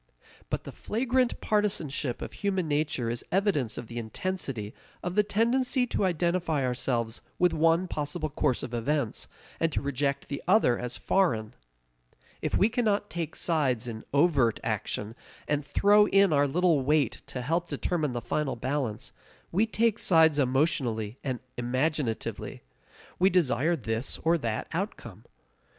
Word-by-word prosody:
But - - -2
the - - -8
flagrant 250 +2 0
partisanship 165 - 0
of - - -7
human 190 -4 -1
nature 145 -4 0
is 120 - -3
evidence 180 - +1
of - - -5
the 120 +1 -6
intensity 120 - -4 0.3
of 180 - -2
the 210 - +5
tendency 245 +5 +2
to 215 - 0
identify 170 -4 0
ourselves 120 -2 -1 0.2
with 180 -1 +3
one 165 +3 +3
possible 155 0 -3
course 130 -3 0
of 125 - -6
events, 125 +1 -1 0.3
and 165 0 +1
to - - 0
reject 140 0 -1
the 140 - -4
other 180 - +4
as 125 0 -3
foreign. 115 - +1 0.9
If - - 0
we 200 - +5
cannot 215 -4 0
take 165 -3 -4
sides 135 -9 +1
in 110 -2 -6
overt 140 -6 +3
action, 105 +2 -2 0.3
and 145 0 0
throw 205 +8 +4
in 195 -4 +4
our 145 0 +4
little 165 0 +2
weight 145 -2 +1
to 125 - -5
help 170 +5 -1
determine 155 -7 -1
the 120 - -3
final 135 +4 -1
balance, 130 -3 -3 0.4
we 205 +6 +2
take 225 0 +1
sides 160 -4 +5
emotionally 130 -5 0
and 130 -3 -2 0.2
imaginatively. 130 0 -2 0.6
We 185 +2 +5
desire 165 -3 +2
this 115 -3 -3
or 165 +1 +3
that 115 -5 -2
outcome. - - -5
150 Hz, 145 wpm, -28 LUFS, 125-180 Hz, 0.9 s, the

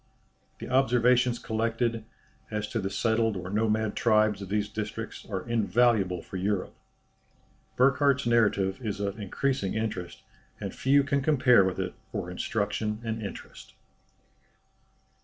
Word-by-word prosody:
The - - -8
observations 125 -1 +3
collected, 115 0 -1 0.4
as 105 -1 -3
to 115 - -2
the 95 -2 -2
settled 110 +1 +1
or 90 +1 -6
nomad 110 0 0
tribes 110 -3 +2
of 100 - -7
these 105 0 0
districts 110 +1 -6
are 95 +1 -4
invaluable 110 -5 +2
for 95 - -7
Europe. 95 0 -1 1.0
Burckhardt's 140 +1 +3
narrative 100 -4 +2
is 105 -2 -3
of 100 +1 -3
increasing 105 +1 -1
interest, 105 -6 -4 0.4
and - - -5
few 140 +2 +3
can 140 0 0
compare 130 -7 +5
with 95 -1 -1
it - - -3 0.2
for 90 - -4
instruction 105 +3 -2
and 110 -1 -3
interest." 100 - -9
110 Hz, 130 wpm, -28 LUFS, 100-120 Hz, 1.0 s, compare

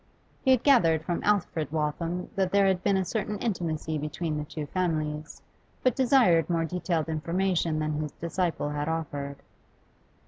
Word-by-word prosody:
He 265 - 0
had 260 -3 +5
gathered 165 - +4
from 175 - -2
Alfred 175 -7 0
Waltham 165 +3 -2
that 190 -2 +1
there 200 0 +4
had 190 -2 +2
been 200 -1 +2
a 190 - 0
certain 210 +1 -2
intimacy 160 -7 -2
between 150 +2 -3
the 150 - -4
'two 150 0 -5
families, 155 -3 -2 0.4
but 255 - +3
desired 235 - +4
more 165 -1 +1
detailed 170 -2 -1
information 165 +1 0
than 155 0 -1
his 150 -2 -4
disciple 170 -2 -2
had 150 +1 -2
offered. 145 -3 -3
165 Hz, 160 wpm, -28 LUFS, 155-190 Hz, 0.4 s, had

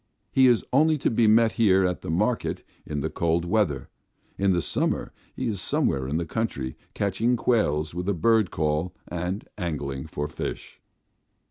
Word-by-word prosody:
He 130 -1 +5
is 120 -3 +3
only 155 +3 +4
to 135 - 0
be 115 0 +3
met 110 +1 +5
here 95 -5 +3
at 90 -1 -1
the - - -6
market 105 +9 0 0.2
in 75 -2 -3
the - - -1
cold 85 0 0
weather; 90 -7 0 0.5
in 100 0 +1
the 90 -2 +3
summer - - -1 0.2
he 130 - -3
is 105 -5 -1
somewhere 65 -7 0
in 75 +4 -1
the 85 - -1
country, 70 - -3 0.2
catching 105 +5 +1
quails 80 -12 +1
with 90 +3 -3
a 100 - +1
bird 110 +2 +3
call 80 +3 -1
and 90 +3 -3
angling 70 -5 -3
for 75 -1 -3
fish. - - -6
90 Hz, 170 wpm, -26 LUFS, 80-110 Hz, 0.5 s, He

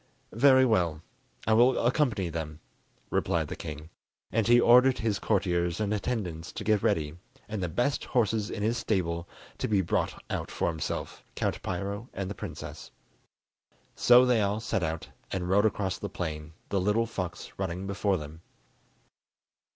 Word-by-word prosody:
"Very 130 +2 +6
well, 85 -9 +1 0.4
I 110 - +3
will 120 +4 +5
accompany 120 - +1
them," 80 -2 -5 0.5
replied - - 0
the - - -4
king; 75 +1 -8 0.4
and 115 -1 +1
he 120 0 +7
ordered 125 +2 +6
his 110 -4 -1
courtiers 90 -4 0
and 105 -1 0
attendants 95 -7 -3
to - - -5
get 105 -2 +2
ready, 75 +1 0 0.3
and 110 -2 -4
the 90 - -1
best 120 - 0
horses 110 -3 +1
in 100 - -4
his 115 +2 +1
stable 85 -6 -1 0.3
to - - -1
be 105 -3 +3
brought 85 - -1
out - - -3
for - - -1
himself, 80 -2 -4
Count - - -1
Piro 100 +6 -4
and 95 0 -3
the - - -2
princess. 100 -8 -8 1.0
So 125 +1 +6
they 125 -3 +3
all 100 +1 0
set 110 - -1
out, 80 -1 -3 0.2
and 90 -2 -3
rode 100 +4 +4
across 95 -3 -2
the 100 - -4
plain, 80 -4 -5 0.2
the 100 - +1
little 105 +4 +2
fox 90 -6 -5
running 95 0 -3
before 100 0 0
them. 75 +1 -9
100 Hz, 160 wpm, -28 LUFS, 85-110 Hz, 1.0 s, he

